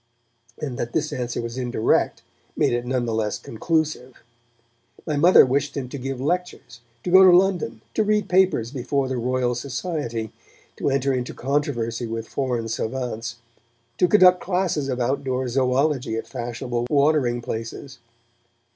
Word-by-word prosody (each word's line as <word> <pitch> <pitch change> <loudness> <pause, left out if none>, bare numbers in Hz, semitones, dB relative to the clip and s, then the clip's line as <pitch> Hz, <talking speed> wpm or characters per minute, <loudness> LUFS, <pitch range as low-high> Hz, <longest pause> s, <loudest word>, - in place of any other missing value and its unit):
and 135 -5 -5
that 120 0 -3
this 155 -1 -1
answer 120 -1 -3
was 115 +2 -5
indirect 120 -3 0 0.3
made - - +2
it 120 0 -2
none 125 -1 0
the 115 - -2
less 110 -1 -1
conclusive. 155 -1 -2 0.8
My 155 - -1
mother 170 +3 +7
wished 140 +2 -1
him 130 -3 -4
to 140 - -6
give 135 0 -4
lectures, 155 -5 -3 0.2
to 180 - -3
go 190 +1 +8
to 185 - +8
London, 180 - 0
to - - +1
read 210 -1 +1
papers 180 -12 +2
before 135 +1 -1
the 130 -1 -2
Royal 125 0 0
Society, 125 - -4 0.5
to - - 0
enter 135 0 +1
into 125 -1 -3
controversy 120 -4 -1
with 115 0 -5
foreign 125 -4 -2
savants, 115 0 -3 0.6
to 180 - +5
conduct 180 -2 +6
classes 180 -6 -1
of 125 -1 -2
outdoor 130 0 -1
zoology 130 0 +1
at 115 - -4
fashionable 120 -1 -4
watering 140 -4 +2
places. 115 +4 -6
130 Hz, 150 wpm, -23 LUFS, 120-150 Hz, 0.8 s, go